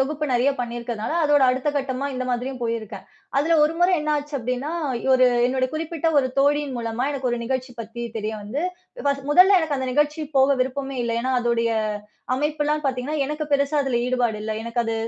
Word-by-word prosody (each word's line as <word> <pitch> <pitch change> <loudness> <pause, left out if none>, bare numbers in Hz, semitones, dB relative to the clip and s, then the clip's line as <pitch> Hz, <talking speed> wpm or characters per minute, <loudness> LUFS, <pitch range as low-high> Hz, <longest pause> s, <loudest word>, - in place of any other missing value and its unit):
தொகுப்பு 300 +3 -1
நெறய 245 +3 +3
பண்ணி 240 0 -4
இருக்கறதனால 235 +2 -4
அதோட 290 -2 +4
அடுத்த 260 +3 -1
கட்டமா 270 0 -2
இந்த 255 0 -2
மாதிரியும் 250 +1 -3
போயிருக்கேன். 220 -4 -4 0.3
அதுல 325 +3 +3
1 305 - +1
முற 350 - +5
என்ன 300 0 0
ஆச்சு 290 0 -5
அப்டின்னா, 255 +5 -3 0.4
ஒரு 255 -1 +6 0.2
என்னு 255 0 0
குறிப்பிட்ட 325 0 -1
1 260 -2 +2
தோழியின் 285 -1 +2
மூலமா 230 +1 -2
எனக்கு 265 -3 -2
ஒரு 240 - -1
நிகழ்ச்சி 255 +1 -3
பத்தி 230 +2 -7
தெரிய 215 0 -2
வந்து, 250 +10 -3 0.4
ஃபர்ஸ் 280 -1 0
முதல்ல 370 +5 +7
எனக்கு 300 -4 -1
அந்த 260 -1 -2
நிகழ்ச்சி 295 +2 +1 0.2
போக 270 +1 +4
விருப்பமே 270 +1 -4
இல்ல. 235 - -1
ஏன்னா 260 +1 0
அதோடைய 235 -1 +1 0.6
அமைப்பு 295 +2 -1
எல்லாம் 300 +1 0
பார்த்தீங்கன்னா 275 +2 -2
எனக்குப் 300 0 -4
பெருசா 280 +1 +2
அதுல 265 -3 0
ஈடுபாடு 245 -3 +1
இல்ல. 220 0 -2
எனக்கு 235 +1 -2
அது 225 - -1
265 Hz, 190 wpm, -23 LUFS, 240-295 Hz, 0.6 s, முதல்ல